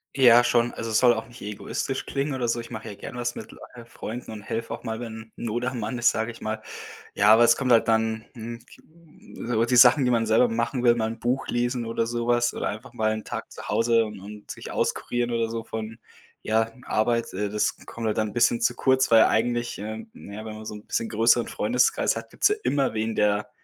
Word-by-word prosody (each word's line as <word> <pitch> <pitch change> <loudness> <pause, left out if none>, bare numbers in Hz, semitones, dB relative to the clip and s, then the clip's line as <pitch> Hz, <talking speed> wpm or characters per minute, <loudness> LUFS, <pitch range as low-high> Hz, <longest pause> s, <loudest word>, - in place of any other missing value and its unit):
Ja, 120 -3 +7
schon. 120 0 +2
Also, 115 0 -4
es 110 - +3
soll 125 -1 +6
auch 110 0 -5
nicht 120 0 -15
egoistisch 105 +6 -4
klingen 140 0 -2
oder 125 -2 -1
so. 120 +1 0
Ich 115 - -8
mache 110 -1 -7
ja 105 - -6
gerne 120 - -8
was 120 0 -2
mit - - -9
Leu - - -14 0.2
äh, 120 -1 -11
Freunden 120 +1 -7
und 110 - -8
helfe 115 +2 -4
auch 115 - -6
mal, 110 -1 -4
wenn 110 -1 -8
Not 120 +2 -3
am 125 -1 -3
Mann 125 +2 -3
ist, 120 0 +4
sage 115 +1 -2
ich 115 - -14
mal. 110 +1 -4 0.5
Ja, 105 +2 +6
aber 120 +1 +6
es 115 - +5
kommt 130 -2 -1
halt 115 - +5
dann, 110 0 +1
hm, 115 0 -7
j - - -18
m 160 -6 -13
so 115 -1 +2
die 125 - +1
Sachen, 125 +3 +7
die 125 - +2
man 115 -2 +1
selber 115 +3 +4
machen 120 +2 -1
will, 120 -1 +6
mal 110 -2 -1
'n 115 +1 -5
Buch 125 +3 -1
lesen 120 0 -1
oder 115 0 -1
sowas 120 0 0
oder - - -3
einfach 110 +6 -7
mal 110 0 0
'n 110 0 -4
Tag - - -6
zu - - -9
Hause 115 -1 +3
und 105 -2 -8
und 105 +2 -10
sich - - -8
auskurieren 120 0 -1
oder 115 -1 0
so 115 0 -4
von, 110 0 -6 0.5
ja, 110 +1 +1
Arbeit, 115 +2 0
äh, 100 +2 -2
das 105 0 0
kommt 115 -1 -6
halt 110 - 0
dann 110 -2 -1
bisschen 120 0 +2
zu 120 +1 +2
kurz, 130 0 +2
weil 115 -1 +7
eigentlich, 120 +2 0
ähm, 110 +1 -7
na 100 - -11
ja, 110 +1 -7
wenn 110 - -6
man 110 0 -9
so 105 - -6
'n 105 - -12
bisschen 115 - -2
größeren 115 +2 +3
Freundeskreis 125 +4 +1
hat, - - -7
gibt's - - +2
ja 420 - +2
immer 140 -4 +1
wen, 110 0 -2
der 105 0 +1
115 Hz, 245 wpm, -25 LUFS, 110-120 Hz, 0.5 s, Ja